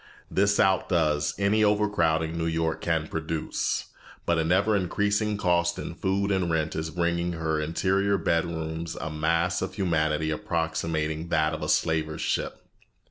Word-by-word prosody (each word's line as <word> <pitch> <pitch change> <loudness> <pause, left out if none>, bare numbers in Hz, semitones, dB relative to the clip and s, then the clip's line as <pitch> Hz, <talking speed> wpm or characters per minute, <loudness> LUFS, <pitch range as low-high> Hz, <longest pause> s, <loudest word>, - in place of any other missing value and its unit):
This 100 +1 +2
outdoes 85 -6 +2
any 100 +2 +2
overcrowding 85 -7 +2
New 80 0 -1
York 80 0 -1
can 80 -2 0
produce, 80 0 -2 0.4
but 85 -1 +2
an 80 +1 0
ever 100 +4 +3
increasing 105 +2 0
cost 85 -3 +1
in - - -5
food 100 +3 0
and 95 -3 +1
rent 80 -1 0
is 80 +1 -2
bringing 85 0 0
into - - -6
her 80 -1 -1
interior 95 +5 +1
bedrooms 80 -1 -2
a 75 - -5
mass 85 +4 +1
of 95 0 -4
humanity 80 -4 +1
approximating 80 0 -2
that 80 -2 +1
of 80 - -4
the - - -3
slaver's 80 -1 +1
ship. - - -2
85 Hz, 150 wpm, -27 LUFS, 80-95 Hz, 0.4 s, ever